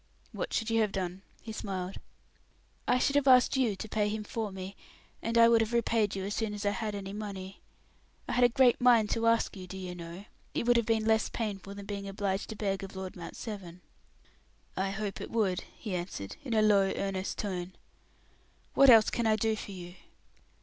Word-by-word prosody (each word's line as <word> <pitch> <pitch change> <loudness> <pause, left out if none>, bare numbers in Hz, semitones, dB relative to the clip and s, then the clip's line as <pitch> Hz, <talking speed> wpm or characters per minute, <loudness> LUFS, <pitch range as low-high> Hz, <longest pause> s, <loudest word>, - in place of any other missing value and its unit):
"What - - -4
should 225 0 -1
you 225 0 +3
have 210 -2 +1
done?" 185 -1 -3 0.2
he 225 - -6
smiled. 190 -3 -4 0.9
"I 250 - +4
should 280 +2 +1
have 285 -1 +3
asked 255 0 +6
you 245 -6 +2
to 220 - -6
pay 210 -1 0
him 215 0 -3
for 215 0 -4
me, 190 +1 -7 0.5
and 230 +1 -1
I 230 0 +8
would 230 -1 +5
have 225 +1 -1
repaid 230 -3 +2
you 190 - -3
as 205 - -3
soon 220 -2 -2
as 205 0 -5
I 205 - +3
had 215 -1 -3
any 195 -1 -6
money. 195 -2 -6 0.7
I - - -3
had 245 0 +3
a 245 - +7
great 250 -1 +4
mind 235 -4 +5
to 230 0 +1
ask 230 -1 +2
you, 185 -2 -8
do 190 - -7
you 185 -1 -5
know; 175 +3 -8 0.3
it - - 0
would 240 0 +4
have 235 -2 +2
been 225 -1 +2
less 220 0 +3
painful 200 -3 -4
than 200 0 -8
being 200 -1 -5
obliged 195 0 -2
to 220 - -5
beg 195 -2 -2
of 195 0 -8
Lord 190 -1 -6
Mount 170 - -8
Severn." 185 -5 -7 0.9
"I 190 +1 0
hope 200 0 -4
it - - -6
would," 200 -5 0
he 210 -5 -5
answered, 175 - -4
in 240 -5 -2
a 215 - +4
low, 200 -2 +4
earnest 195 -1 -2
tone. 185 -3 -3 1.0
"What 275 -1 +7
else 225 -3 +7
can 235 -1 0
I 215 - +4
do 220 +1 +1
for 210 - -7
you?" 175 -2 -8
205 Hz, 215 wpm, -30 LUFS, 190-225 Hz, 1.0 s, I